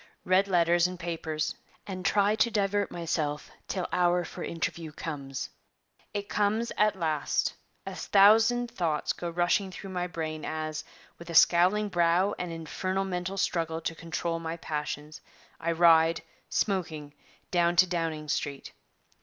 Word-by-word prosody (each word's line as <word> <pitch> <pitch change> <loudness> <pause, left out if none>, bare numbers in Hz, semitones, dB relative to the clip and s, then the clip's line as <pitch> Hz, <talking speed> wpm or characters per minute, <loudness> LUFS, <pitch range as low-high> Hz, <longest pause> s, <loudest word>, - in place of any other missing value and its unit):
Read 185 +2 +4
letters 175 -1 +3
and 180 -1 -7
papers 160 -3 -2 0.3
and 185 -2 -6
try 205 +2 +3
to 235 - +3
divert 205 -1 0
myself 155 -3 -3 0.2
till 185 -3 -2
hour 175 0 +2
for - - -7
interview 165 -1 -3
comes. 140 -3 -5 0.6
'It 205 -1 -4
comes 215 +3 0
at 210 -1 +3
last: 155 -4 0 0.3
a - - -5
thousand 225 +4 +4
thoughts 165 -9 -1
go 175 - -5
rushing 175 +3 +1
through 190 +1 -8
my 180 -1 -2
brain 160 -2 -4
as, 155 -1 -3 0.4
with 170 - -11
a 170 - -4
scowling 185 +6 +5
brow 175 +1 +2
and 180 -1 -3
infernal 185 +4 -2
mental 185 +1 -3
struggle 165 -3 0
to 165 - -3
control 165 +1 -3
my 165 0 -4
passions, 150 -1 -5 0.4
I 170 0 -1
ride, 165 -1 +5 0.3
smoking, 160 -7 -1 0.4
down 175 -1 +3
to 180 +2 +7
Downing 165 -4 -2
Street. 140 -1 -3
170 Hz, 145 wpm, -28 LUFS, 160-190 Hz, 0.6 s, to